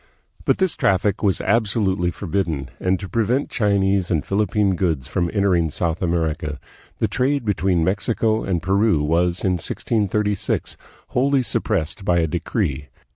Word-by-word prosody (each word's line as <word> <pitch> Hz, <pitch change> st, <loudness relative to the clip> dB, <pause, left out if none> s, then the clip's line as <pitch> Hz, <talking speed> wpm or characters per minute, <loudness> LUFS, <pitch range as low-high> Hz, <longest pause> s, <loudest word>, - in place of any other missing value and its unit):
But -, -, +3 dB
this 190 Hz, -4 st, +1 dB
traffic 100 Hz, +1 st, +1 dB
was 100 Hz, -3 st, +1 dB
absolutely 100 Hz, -5 st, +1 dB
forbidden, 85 Hz, -6 st, -3 dB
and 95 Hz, 0 st, +1 dB
to 95 Hz, -, -6 dB
prevent 120 Hz, +6 st, 0 dB
Chinese 100 Hz, -4 st, +1 dB
and 80 Hz, -5 st, 0 dB
Philippine 100 Hz, -1 st, +1 dB
goods 80 Hz, -8 st, -1 dB
from 85 Hz, -2 st, -1 dB
enter 100 Hz, -2 st, +2 dB
ing 85 Hz, -2 st, +2 dB
South 85 Hz, +2 st, -2 dB
America, 80 Hz, -4 st, -1 dB, 0.4 s
the -, -, +1 dB
trade 135 Hz, 0 st, 0 dB
between 90 Hz, -3 st, +1 dB
Mexico 110 Hz, +4 st, 0 dB
and 85 Hz, -3 st, -1 dB
Peru 95 Hz, -3 st, +2 dB
was 85 Hz, +3 st, +1 dB
in 90 Hz, -2 st, +1 dB
1636 105 Hz, -1 st, -1 dB, 0.3 s
wholly 135 Hz, +1 st, +2 dB
suppressed 100 Hz, -4 st, -1 dB
by 90 Hz, -2 st, +2 dB
a 85 Hz, -, +3 dB
decree. 80 Hz, -, -2 dB
95 Hz, 145 wpm, -21 LUFS, 85-105 Hz, 0.4 s, But